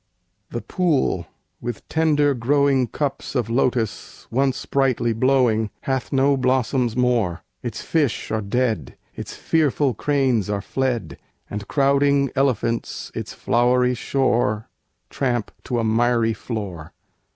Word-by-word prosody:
The - - -5
pool, 145 - 0 0.3
with 120 -2 -5
tender 150 -3 +2
growing 135 +1 +2
cups 140 +3 -3
of 115 -3 0
lotus 120 -4 -1
Once 130 +1 0
brightly 130 -4 +1
blowing, 115 -3 +2
hath 130 -2 -2
no 140 +1 +3
blossoms 130 -2 +1
more! 115 -9 +1 0.2
Its 115 -4 -5
fish 150 -8 0
are 110 0 0
dead, 110 - -1 0.2
its - - -7
fearful 145 -4 +1
cranes 130 -4 +1
are 100 -1 0
fled, 125 +3 -2 0.3
And 105 0 -5
crowding 140 0 +3
elephants 120 -4 -1
its - - -5
flowery 125 +1 +2
shore 120 -4 0 0.4
Tramp 120 -5 -1
to 125 - -1
a 115 - +1
miry 115 0 +2
floor. 100 -10 -6
125 Hz, 120 wpm, -22 LUFS, 115-135 Hz, 0.4 s, no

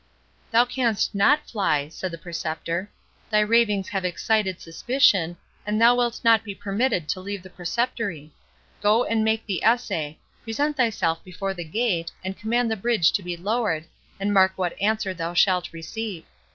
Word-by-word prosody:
"Thou 235 +1 +5
canst 245 -4 0
not 285 +10 +3
fly," 150 -10 0
said 185 +4 -5
the 170 - -7
Preceptor; 170 +2 -4 0.4
"thy 210 -1 +3
ravings 210 -3 +2
have 195 -2 -2
excited 190 +1 0
suspicion, 175 - +2 0.3
and 210 +1 -1
thou 235 +1 +7
wilt 240 -1 0
not 225 -2 +5
be 200 -3 -7
permitted 200 - -1
to 190 - -1
leave 200 0 -6
the 185 - -13
Preceptory. 185 - -3 0.5
Go 215 +3 +4
and 225 -1 0
make 220 0 +1
the 190 -5 -3
essay—present 225 - -1
thyself 195 - 0
before 195 +2 -4
the 175 -2 -6
gate, 170 -1 -1
and 190 +1 -4
command 230 +3 0
the - - +1
bridge 220 -5 +2
to - - 0
be 175 -1 -5
lowered, 200 -4 -1 0.3
and 200 +1 0
mark 190 -1 +5
what 180 -2 -1
answer 210 -2 +1
thou 170 0 -4
shalt 180 0 +3
receive. 170 +3 -6
200 Hz, 165 wpm, -24 LUFS, 175-225 Hz, 0.5 s, thou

